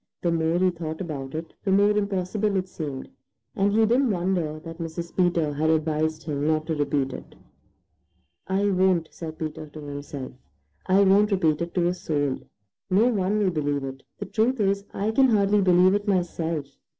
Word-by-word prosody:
The 170 Hz, -, +2 dB
more 165 Hz, 0 st, +1 dB
he 185 Hz, 0 st, +3 dB
thought 160 Hz, -2 st, -6 dB
about 145 Hz, -6 st, -5 dB
it, 165 Hz, +1 st, -6 dB
the 195 Hz, -, 0 dB
more 200 Hz, +2 st, +5 dB
impossible 205 Hz, 0 st, 0 dB
it 185 Hz, -1 st, 0 dB
seemed, 145 Hz, -7 st, -6 dB, 0.5 s
and 200 Hz, +1 st, +2 dB
he 220 Hz, +2 st, +4 dB
didn't 245 Hz, +4 st, +3 dB
wonder 175 Hz, -5 st, -1 dB
that 165 Hz, +1 st, -9 dB
Mrs. 170 Hz, +1 st, -6 dB
Peter 170 Hz, -5 st, +2 dB
had 155 Hz, +2 st, 0 dB
advised 155 Hz, 0 st, 0 dB
him 145 Hz, -2 st, -2 dB
not 155 Hz, 0 st, +1 dB
to 160 Hz, -, -1 dB
repeat 145 Hz, -2 st, 0 dB
it. -, -, -10 dB, 1.1 s
"I 200 Hz, +2 st, +1 dB
won't," 185 Hz, -3 st, +2 dB
said 160 Hz, -2 st, -8 dB
Peter 155 Hz, 0 st, -5 dB
to 150 Hz, +1 st, -11 dB
himself. 145 Hz, -2 st, -7 dB, 0.6 s
"I 195 Hz, +2 st, +5 dB
won't 200 Hz, +2 st, +5 dB
repeat 165 Hz, -6 st, +1 dB
it 170 Hz, 0 st, -4 dB
to 175 Hz, -2 st, +2 dB
a 175 Hz, -, +2 dB
soul. 145 Hz, -6 st, -1 dB, 0.5 s
No 210 Hz, +6 st, +4 dB
one 205 Hz, -2 st, 0 dB
will 200 Hz, -3 st, +2 dB
believe 145 Hz, -3 st, -1 dB
it. 135 Hz, 0 st, -6 dB, 0.2 s
The -, -, -5 dB
truth 235 Hz, +3 st, 0 dB
is, 200 Hz, -1 st, +1 dB
I 210 Hz, +2 st, -1 dB
can 265 Hz, +4 st, +4 dB
hardly 205 Hz, -2 st, +3 dB
believe 185 Hz, 0 st, +5 dB
it 205 Hz, +1 st, -1 dB
myself. 170 Hz, -5 st, -1 dB
175 Hz, 185 wpm, -25 LUFS, 155-195 Hz, 1.1 s, more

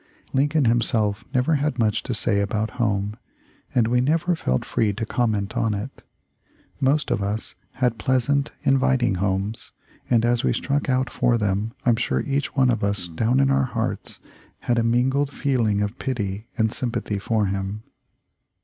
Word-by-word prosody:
Lincoln 145 Hz, +2 st, +2 dB
himself 115 Hz, -3 st, +2 dB
never 130 Hz, +5 st, +2 dB
had 145 Hz, -2 st, -1 dB
much 110 Hz, -3 st, +1 dB
to -, -, -4 dB
say 100 Hz, -, +3 dB
about 105 Hz, +2 st, -1 dB
home, 105 Hz, -1 st, 0 dB, 0.6 s
and 120 Hz, -3 st, +4 dB
we 125 Hz, +1 st, +2 dB
never 165 Hz, +6 st, +1 dB
felt 65 Hz, -, -1 dB
free 105 Hz, -3 st, 0 dB
to 115 Hz, +3 st, -3 dB
comment 110 Hz, -2 st, -1 dB
on 115 Hz, -3 st, +1 dB
it. 105 Hz, +7 st, -6 dB, 0.8 s
Most 140 Hz, +3 st, +1 dB
of -, -, +1 dB
us 100 Hz, +3 st, -3 dB, 0.2 s
had 125 Hz, -3 st, 0 dB
pleasant, 140 Hz, +3 st, +1 dB
inviting 130 Hz, -4 st, +2 dB
homes, 95 Hz, +4 st, -2 dB, 0.4 s
and 115 Hz, -2 st, +3 dB
as 120 Hz, 0 st, +1 dB
we -, -, +2 dB
struck 140 Hz, 0 st, -1 dB
out 130 Hz, -1 st, +1 dB
for 120 Hz, -1 st, +2 dB
them 105 Hz, +1 st, -1 dB
I'm 120 Hz, -2 st, +4 dB
sure -, -, 0 dB
each 140 Hz, 0 st, -2 dB
one 130 Hz, -2 st, +4 dB
of 115 Hz, -, -1 dB
us 100 Hz, -3 st, -1 dB
down 110 Hz, +10 st, +1 dB
in 135 Hz, 0 st, +3 dB
our 135 Hz, 0 st, +3 dB
hearts 115 Hz, -3 st, -3 dB, 0.4 s
had 120 Hz, -1 st, +1 dB
a -, -, +2 dB
mingled 130 Hz, +4 st, +2 dB
feeling 115 Hz, -8 st, 0 dB
of 105 Hz, +5 st, -4 dB
pity 105 Hz, -4 st, -3 dB
and 110 Hz, -2 st, +2 dB
sym 125 Hz, 0 st, -1 dB
pathy 100 Hz, -3 st, -3 dB
for 110 Hz, 0 st, +1 dB
him." 100 Hz, +2 st, -3 dB
115 Hz, 170 wpm, -23 LUFS, 105-130 Hz, 0.8 s, and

